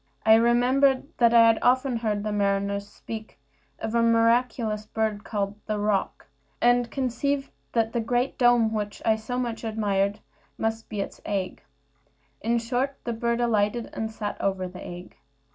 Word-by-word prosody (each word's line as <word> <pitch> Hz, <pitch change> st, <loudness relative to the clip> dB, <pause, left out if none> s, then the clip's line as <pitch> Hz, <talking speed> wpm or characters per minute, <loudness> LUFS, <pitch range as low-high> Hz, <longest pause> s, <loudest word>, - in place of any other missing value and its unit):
I 220 Hz, -, +7 dB
remembered 255 Hz, +5 st, +3 dB
that 235 Hz, -2 st, +5 dB
I 230 Hz, -1 st, +7 dB
had 225 Hz, -1 st, +4 dB
often 255 Hz, 0 st, +2 dB
heard 215 Hz, -3 st, -1 dB
mariners 200 Hz, -1 st, 0 dB
speak 220 Hz, +1 st, -9 dB, 0.4 s
of 220 Hz, -, -4 dB
a 235 Hz, -, +3 dB
miraculous 230 Hz, -1 st, +2 dB
bird 220 Hz, -2 st, -2 dB
called 205 Hz, -1 st, -3 dB
the 215 Hz, -1 st, -1 dB
roc, 205 Hz, -1 st, -1 dB, 0.3 s
and 245 Hz, 0 st, +3 dB
conceived 270 Hz, +2 st, -1 dB, 0.2 s
that 225 Hz, -1 st, +1 dB
the 240 Hz, -, 0 dB
great 245 Hz, +3 st, 0 dB
dome 240 Hz, -3 st, +4 dB
which 205 Hz, -1 st, -4 dB
I 220 Hz, -, +4 dB
so 220 Hz, +3 st, -5 dB
much 240 Hz, -2 st, -3 dB
admired 205 Hz, -2 st, 0 dB, 0.4 s
must 225 Hz, 0 st, -2 dB
be 210 Hz, -2 st, -3 dB
its -, -, -7 dB
egg. 195 Hz, -3 st, -3 dB, 0.8 s
In 235 Hz, +2 st, +1 dB
short, 250 Hz, +4 st, -1 dB
the 235 Hz, -, -2 dB
bird 235 Hz, +1 st, -1 dB
alighted, 225 Hz, 0 st, 0 dB
and 220 Hz, 0 st, -3 dB
sat 215 Hz, -2 st, -5 dB
over 190 Hz, -1 st, -1 dB
the 180 Hz, 0 st, -10 dB
egg. 175 Hz, +1 st, -9 dB
225 Hz, 160 wpm, -26 LUFS, 210-240 Hz, 0.8 s, I